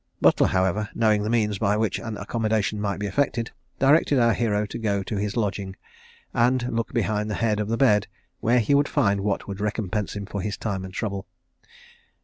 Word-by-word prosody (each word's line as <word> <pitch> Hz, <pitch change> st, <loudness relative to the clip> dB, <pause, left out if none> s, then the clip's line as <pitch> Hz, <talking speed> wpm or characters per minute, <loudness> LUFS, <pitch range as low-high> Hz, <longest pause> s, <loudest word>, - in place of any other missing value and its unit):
Butler, -, -, +4 dB
however, 95 Hz, +3 st, 0 dB
knowing 110 Hz, -2 st, +3 dB
the 105 Hz, -, -2 dB
means 105 Hz, -4 st, +1 dB
by 105 Hz, -1 st, +2 dB
which 110 Hz, -1 st, 0 dB
an 110 Hz, -3 st, -5 dB
accommodation 110 Hz, -2 st, -1 dB
might 100 Hz, -2 st, -1 dB
be 105 Hz, -, -2 dB
effected, 120 Hz, +1 st, -1 dB, 0.3 s
directed 140 Hz, +1 st, +4 dB
our 115 Hz, -2 st, +4 dB
hero 105 Hz, -3 st, 0 dB
to 110 Hz, +3 st, -6 dB
go 100 Hz, -3 st, 0 dB
to 105 Hz, -, -4 dB
his 105 Hz, +3 st, -2 dB
lodging, 100 Hz, -3 st, -2 dB, 0.6 s
and 120 Hz, +1 st, +2 dB
look 115 Hz, 0 st, -1 dB
behind 105 Hz, 0 st, 0 dB
the 105 Hz, -, -2 dB
head 110 Hz, -1 st, 0 dB
of 105 Hz, -, -1 dB
the 115 Hz, +1 st, -1 dB
bed, 105 Hz, -6 st, +3 dB, 0.3 s
where 120 Hz, +2 st, +3 dB
he 115 Hz, -, +1 dB
would 145 Hz, +1 st, +4 dB
find 100 Hz, -9 st, +2 dB
what 100 Hz, 0 st, -1 dB
would 100 Hz, -1 st, -6 dB
recompense 105 Hz, -1 st, -2 dB
him 100 Hz, 0 st, -4 dB
for 100 Hz, -1 st, -4 dB
his 105 Hz, +2 st, -3 dB
time 100 Hz, -4 st, -3 dB
and 95 Hz, 0 st, -8 dB
trouble. 100 Hz, -4 st, -3 dB
105 Hz, 200 wpm, -24 LUFS, 100-115 Hz, 0.6 s, Butler